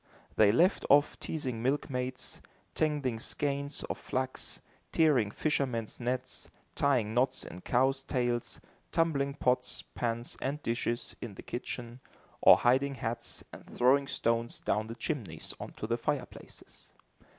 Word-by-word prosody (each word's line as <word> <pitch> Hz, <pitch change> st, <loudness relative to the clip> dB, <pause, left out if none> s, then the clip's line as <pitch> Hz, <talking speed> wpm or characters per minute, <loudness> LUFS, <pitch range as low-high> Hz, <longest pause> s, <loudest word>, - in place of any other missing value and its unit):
They 105 Hz, -2 st, +6 dB
left 175 Hz, -, +4 dB
off 145 Hz, +1 st, +5 dB
teasing 130 Hz, -7 st, -3 dB
milkmaids, 130 Hz, -1 st, -2 dB, 0.3 s
tangling 145 Hz, -7 st, 0 dB
skeins 140 Hz, +3 st, -1 dB
of -, -, -4 dB
flax, 130 Hz, 0 st, -3 dB, 0.3 s
tearing 145 Hz, -10 st, +4 dB
fishermen's 125 Hz, -4 st, -1 dB
nets, 125 Hz, +1 st, -2 dB, 0.2 s
tying 125 Hz, -7 st, +2 dB
knots 130 Hz, +2 st, +2 dB
in 90 Hz, -, -9 dB
cows' 135 Hz, +4 st, +2 dB
tails, 120 Hz, -3 st, -1 dB, 0.3 s
tumbling 140 Hz, -4 st, +1 dB
pots, 125 Hz, -2 st, +1 dB
pans 120 Hz, 0 st, -3 dB
and 140 Hz, +3 st, -1 dB
dishes, 120 Hz, 0 st, -1 dB
in 110 Hz, -5 st, -6 dB
the -, -, -10 dB
kitchen, 120 Hz, 0 st, -5 dB, 0.4 s
or -, -, +9 dB
hiding 135 Hz, +3 st, +3 dB
hats, 115 Hz, -1 st, -4 dB
and -, -, -10 dB
throwing 135 Hz, +3 st, +3 dB
stones 115 Hz, -1 st, 0 dB
down 110 Hz, +1 st, 0 dB
the 115 Hz, -, -6 dB
chimneys 130 Hz, -, -4 dB
onto -, -, -6 dB
the 115 Hz, +1 st, 0 dB
fireplaces. 135 Hz, -1 st, -5 dB
125 Hz, 130 wpm, -31 LUFS, 120-140 Hz, 0.4 s, or